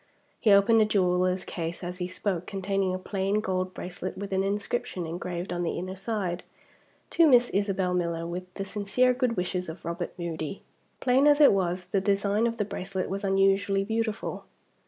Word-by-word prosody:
He 220 - +2
opened 200 +3 +6
a - - +5
jeweler's 185 -2 +1
case 170 0 -5
as 180 +1 -5
he 180 - -2
spoke, 185 -1 -3
containing 195 -1 -1
a 185 - -1
plain 195 +2 -1
gold 185 -2 -1
bracelet 180 +1 -6
with 195 0 -5
an 190 0 +2
inscription 200 -2 -2
engraved 175 +2 -4
on 175 - -2
the 170 - -1
inner 185 +1 -4
side: 190 -3 -3 0.7
"To 335 -2 +5
Miss 245 -3 +5
Isabel 195 -2 0
Miller, 170 -2 -1
with 180 +2 -6
the 195 - -4
sincere 210 +6 +1
good 250 -2 0
wishes 180 -1 -2
of 160 - -9
Robert 170 +1 -4
Moody." 170 0 -4 0.4
Plain 265 +3 +4
as 290 0 +5
it 290 - +8
was, 180 -1 -1
the 190 +2 0
design 200 +3 +2
of 230 0 -3
the 210 - 0
bracelet 190 -2 -4
was 195 +1 -3
unusually 195 0 +2
beautiful. 220 +1 -2
195 Hz, 180 wpm, -27 LUFS, 180-205 Hz, 0.7 s, it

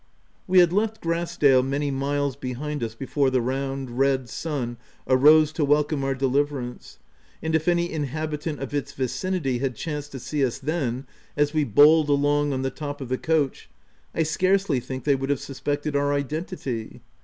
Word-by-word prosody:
We 185 0 +3
had 175 -1 +6
left 220 +2 0
Grass 170 +1 -2
dale 135 -3 +5
many 140 +2 -1
miles 140 0 -1
behind 140 +3 -4
us 110 -1 -4
before 135 +2 0
the 130 -1 +2
round, 135 0 -3
red 135 -2 +2
sun 125 -5 -3 0.3
arose 150 +4 +6
to 155 0 -1
welcome 145 0 +2
our 135 0 0
deliverance, 135 -1 -2 0.4
and 160 0 -3
if 160 +1 +1
any 175 0 +2
inhabitant 155 0 -3
of 135 +1 -5
its 140 -1 -2
vicinity 135 0 -1
had 130 -2 -2
chanced 145 +1 -5
to 135 - -5
see 145 +3 -2
us 125 -3 0
then, 135 -4 -2 0.3
as 145 +1 +2
we 155 -2 +2
bowled 150 +6 +6
along 145 +1 +2
on 130 -1 -2
the 135 - -1
top 145 +1 -6
of 135 -3 -6
the 130 - 0
coach, 155 -4 0 0.5
I 165 - +2
scarcely 185 -1 +1
think 130 +1 -6
they 145 - +3
would 135 0 -2
have 145 -2 +1
suspected 145 +2 -3
our 145 0 +2
identity. 140 - -4
145 Hz, 180 wpm, -24 LUFS, 135-155 Hz, 0.5 s, had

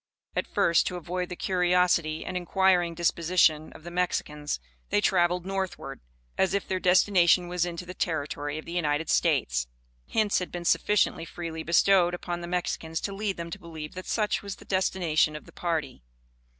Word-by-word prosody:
At - - -1
first, 170 - +3
to 180 - -3
avoid 180 +1 -4
the 180 - -5
curiosity 180 -4 +1
and 185 - -5
inquiring 180 -1 +2
disposition 170 -2 +2
of - - -14
the 175 - -8
Mexicans, 150 - -2 0.3
they - - +3
traveled 175 - +2
northward, 190 -1 -4 0.4
as 190 +1 +2
if 200 - -2
their 185 - -1
destination 180 -1 +4
was 175 0 0
into 175 +1 -6
the 180 - -7
territory 145 -3 -2
of 155 - -7
the - - -8
United 160 -2 0
States. - - +1 0.4
Hints 215 -2 +2
had 180 - -5
been 175 -1 -6
sufficiently 210 -3 +2
freely 165 -1 -6
bestowed 175 +2 +4
upon 175 -1 -5
the 170 - -6
Mexicans 165 -2 -2
to 200 - -3
lead 200 -1 -2
them 170 0 -6
to - - -6
believe 160 -2 -8
that 185 0 -8
such 215 -2 0
was 200 -1 -6
the - - -16
destination 175 -5 +1
of 150 - -8
the - - -15
party. 160 - -3
175 Hz, 175 wpm, -27 LUFS, 160-185 Hz, 0.4 s, destination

